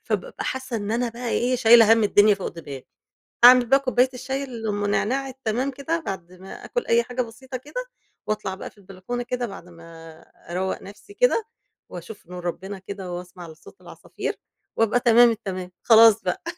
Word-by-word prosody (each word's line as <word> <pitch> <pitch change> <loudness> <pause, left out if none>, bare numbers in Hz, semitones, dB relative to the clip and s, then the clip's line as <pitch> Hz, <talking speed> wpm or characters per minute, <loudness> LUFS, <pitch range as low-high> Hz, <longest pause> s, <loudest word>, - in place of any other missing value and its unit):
فبابقى - - -4
حاسة 260 -2 -4
إن 205 0 -4
أنا 240 +1 0
بَقى 235 +1 -6
إيه 250 +2 0
شايلة 225 -2 +7
هَم 225 -1 +4
الدنيا 205 0 +5
فوق 195 - -5
دماغي. 140 -6 -10 0.6
أعمِل 250 0 +9
بَقى 270 +3 +4
كوباية 255 -1 +2
الشاي 265 +2 -4
اللي 230 -4 -6
أم 205 0 -2
نعناع 265 +6 0
التمام 255 +1 -2
كده 285 +5 -3
بعد 185 - -7
ما 185 +1 -11
آكل 485 - -3
أي 235 0 +3
حاجة 250 +1 -3
بسيطة 255 +3 -9
كده، - - -7 0.4
وأطلع 210 -3 -3
بَقى - - -8
في - - -28
البلكونة 195 +5 -6
كده 245 0 -3
بعد 195 -4 -11
ما 165 -1 -13 0.4
أرَوّق 185 +2 -3
نَفْسي 205 - -13
كده، 460 -1 +2 0.4
وأشوف 175 +2 -10
نور 180 -1 -8
ربنا 190 +3 -5
كده، 190 -2 -7
وأسمع 180 -1 -8
لصوت 160 - -16
العصافير، - - -6 0.4
وأبقى 225 +2 +2
تمام 240 0 +6
التمام. 190 -5 -5
خلاص 225 -1 +6
بَقى. 180 -1 -3
225 Hz, 175 wpm, -23 LUFS, 190-250 Hz, 0.6 s, أعمِل